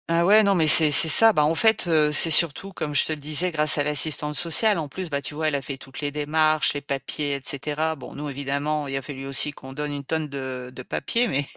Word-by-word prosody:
Ah 170 +1 +1
ouais, 215 +3 +5
non, 200 -1 +1
mais 160 -3 +1
c'est 155 0 +7
c'est 155 - +6
ça. 225 +7 +7
Beh 155 - 0
en 150 +2 +1
fait, 220 0 +1
heu, 155 -3 +2
c'est 160 +2 +7
surtout, 170 +5 +1
comme 150 -4 -6
je - - +3
te 155 - -3
le 155 - -9
disais, 155 +5 -2
grâce 155 -1 +1
à 145 - 0
l'assistante 150 0 -2
sociale 175 +6 +1
en 155 -3 -4
plus, 180 +4 -7
bah 140 -2 -3
tu 145 - -9
vois? 155 +1 -2
Elle 150 - -1
a 140 - -3
fait 135 +1 -8
toutes 135 +1 -12
les 145 -1 -3
démarches, 155 +1 0
les 145 - -5
papiers 140 +1 -5
et - - -6
cetera. 150 +3 -2
Bon, 140 - -12
nous, 150 +1 -7
évidemment, 140 +2 -4
il 135 0 -4
a - - -4
fallu 135 0 -9
aussi 135 +2 +2
qu'on 130 -2 -13
donne 150 +1 -5
une 140 -1 -7
tonne 160 +2 -4
de 130 -3 -8
de 130 - -9
papier, 235 - -2
mais 140 -8 -2
150 Hz, 270 wpm, -22 LUFS, 140-160 Hz, -, c'est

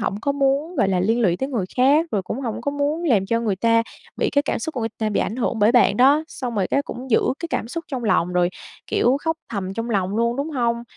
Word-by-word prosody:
hổng 200 - -2
có 280 - 0
muốn, 280 +5 0
gọi 205 -6 +2
là, 185 -2 +1
liên 225 +6 +1
lụy 180 -6 +2
tới 265 - -3
người 235 -9 -1
khác, 285 +6 +4
rồi 200 - 0
cũng 230 - -5
hổng 235 -5 -4
có 285 - -2
muốn 290 +4 -1
làm 215 - +2
cho 230 +3 0
người 210 -5 -1
ta 230 +2 +3 0.3
bị - - 0
cái 285 0 +2
cảm - - -2
xúc 320 -2 -5
của 245 - -3
người 225 - -1
ta 220 - 0
bị 205 - 0
ảnh 220 - -2
hưởng 235 -2 -1
bởi 210 +2 +4
bạn 240 -5 +4
đó, 280 +6 +5
xong 245 -6 -5
rồi 195 -3 +1
cái 280 - +1
cũng 255 -1 -8
giữ 225 - +5 0.2
cái 335 - -4
cảm 230 - -2
xúc 335 +5 -5
trong 255 -4 -4
lòng 180 -4 +1
rồi, 180 0 +2 0.4
kiểu, 250 +3 +2
khóc 320 0 0
thầm 195 -4 -4
trong 230 +1 -3
lòng 195 -1 0
luôn, 235 +2 +1
đúng 285 +3 -3
hông? 235 -4 0
235 Hz, 280 wpm, -22 LUFS, 210-280 Hz, 0.4 s, đó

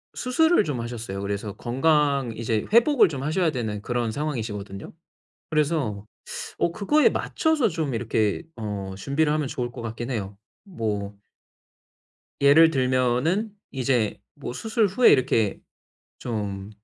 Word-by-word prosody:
수술을 320 +3 +3
좀 140 -8 -3
하셨어요. 115 -5 -5
그래서 100 0 -3
건강 140 +1 +1
이제 110 -1 -1
회복을 240 +3 +6
좀 140 -5 -5
하셔야 160 +3 +1
되는 110 -6 -3
그런 120 -1 -1
상황이시거든요. 110 -8 -4 0.6
그래서 150 -10 0 0.5
어 - - +2
그거에 290 - +3
맞춰서 315 -8 +1
좀 155 -6 -2
이렇게 110 -1 0
어 100 -3 -5
준비를 150 +8 0
하면 150 -2 0
좋을 125 -3 -4
것 120 - -8
같긴 115 +2 -5
해요. 100 -5 -4 0.3
뭐 105 - -4 1.3
예를 150 +4 +7
들면은 130 - +1 0.2
이제 125 -5 0 0.2
뭐 - - -6
수술 220 - 0
후에 225 +7 +5
이렇게 115 -6 +2 0.6
좀 105 -3 -4
125 Hz, 275 characters per minute, -25 LUFS, 110-160 Hz, 1.3 s, 예를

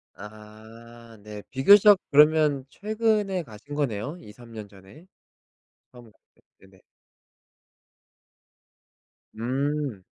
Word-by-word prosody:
아 110 +3 -14
네. 105 -1 -9
비교적 200 +9 +6
그러면 150 -2 +3
최근에 210 -3 -1
가신 115 +5 -12
거네요? 140 - -3
2-3 115 +1 -15
년 110 -2 -9
전에. 100 - -18 0.9
하묵 120 -3 -17 0.2
네. - - -31 0.3
네네. 95 -1 -23 2.6
음. 135 -2 -3
125 Hz, 145 characters per minute, -25 LUFS, 110-150 Hz, 2.6 s, 비교적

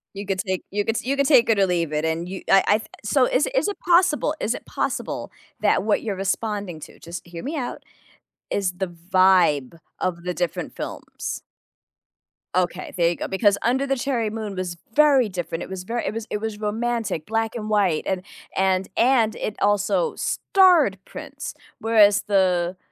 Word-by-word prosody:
You 200 +1 -5
could 195 -1 -2
take 185 -2 -2
you 205 +1 -1
could 225 0 0
you 275 +2 0
could 280 - +3
take 260 -6 +5
it 220 -3 +3
or 195 - +5
leave 170 -3 0
it, 150 +1 -1
and 160 +2 -1
you 190 +1 -6
I 195 - +6
I 210 - +5
th 215 - -10 0.2
so, 255 +5 +3
is 300 - +2
is - - +2
it 410 - -3
possible 345 -4 +3
is 230 - 0
it - - -8
possible - - -3 0.3
that - - +2
what 215 0 +1
you're 210 -3 -2
responding 195 -2 -2
to- - - -11
just 170 +1 -8
hear 170 -1 -8
me 305 +4 -3
out- 245 -3 -4 0.7
is 195 -2 0
the 190 -1 -1
vibe 175 -4 +2 0.2
of 175 -2 -2
the 180 0 -2
different 175 -2 -3
films. - - -6 1.1
Okay, 180 0 -1
there 170 -1 +4
you 175 - -1
go. - - -4
Because 200 +1 +2
Under 260 +4 +2
the 270 0 0
Cherry 245 -4 -1
Moon 215 -2 -5
was 180 -2 -4 0.2
very 285 -4 +5
different. 175 -2 -4
It - - -9
was 190 -1 -6
very 235 +5 -3
it - - -2
was 225 0 -4
it - - -1
was 220 0 -4
romantic, 220 -5 -2
black 225 +2 -1
and 215 -2 -4
white 195 -7 +2
and 190 -1 -1 0.3
and 190 0 +1
and 235 -3 +3
it 210 - -4
also 205 - +1
starred 355 - +3
Prince. - - -8 0.3
Whereas 215 -3 +5
the 185 -3 +2
205 Hz, 190 wpm, -23 LUFS, 180-230 Hz, 1.1 s, I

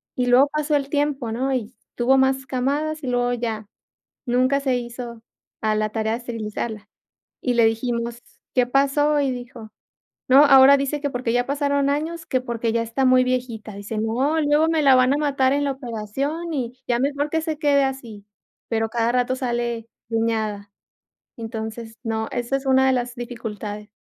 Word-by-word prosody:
y 250 -1 0
luego 250 +3 +6
pasó 300 0 0
el 280 -1 -1
tiempo, 285 -5 -1
¿no?, 260 +4 -1
y 240 -2 -3 0.2
tuvo 255 +3 +3
más 265 0 +2
camadas 285 +5 -1
y - - -4
luego 245 0 +1
ya, 225 -3 -3 0.6
nunca 255 +3 +2
se 265 -2 +1
hizo 235 -1 -7 0.4
a 215 0 +1
la 215 0 0
tarea 220 0 -1
de 230 - -1
esterilizarla, 220 -2 -5 0.5
y 250 - +1
le 235 -1 +5
dijimos: 235 +1 -2 0.3
"¿Qué 250 - +4
pasó?", 280 +3 +2
y 275 -2 +1
dijo: 245 -3 -8 0.6
"No", 270 +3 +8
ahora 275 0 +8
dice 280 +2 -2
que 285 - -1
porque 245 -2 -2
ya 245 - +2
pasaron 280 0 +1
años, 325 +3 -2
que 255 - 0
porque 235 -2 -2
ya 230 - +1
está 230 +4 -1
muy 255 0 +5
viejita, 245 -4 -3
dice: 205 +2 -5
"No, 255 +9 +1
luego 300 +2 +3
me 320 -2 +1
la 275 -2 +6
van 255 +1 +4
a - - +1
matar 275 -3 +2
en 285 +1 +1
la 280 - 0
operación 270 +7 -4
y 245 -4 -2
ya 240 -1 +1
mejor 285 +2 0
que 320 +1 +1
se 315 -2 -3
quede 285 -3 +3
así", 235 -7 -5 0.4
pero 225 -1 0
cada 235 +1 0
rato 250 +1 +1
sale 240 -3 -2 0.2
preñada, 220 -3 -1 0.7
entonces, 225 0 -6
no, 220 -2 -2
esa 245 +3 -1
es 275 - -6
una 265 0 +4
de 265 - +4
las 245 -1 -1
dificultades. 220 -4 -6
250 Hz, 180 wpm, -22 LUFS, 230-275 Hz, 0.7 s, No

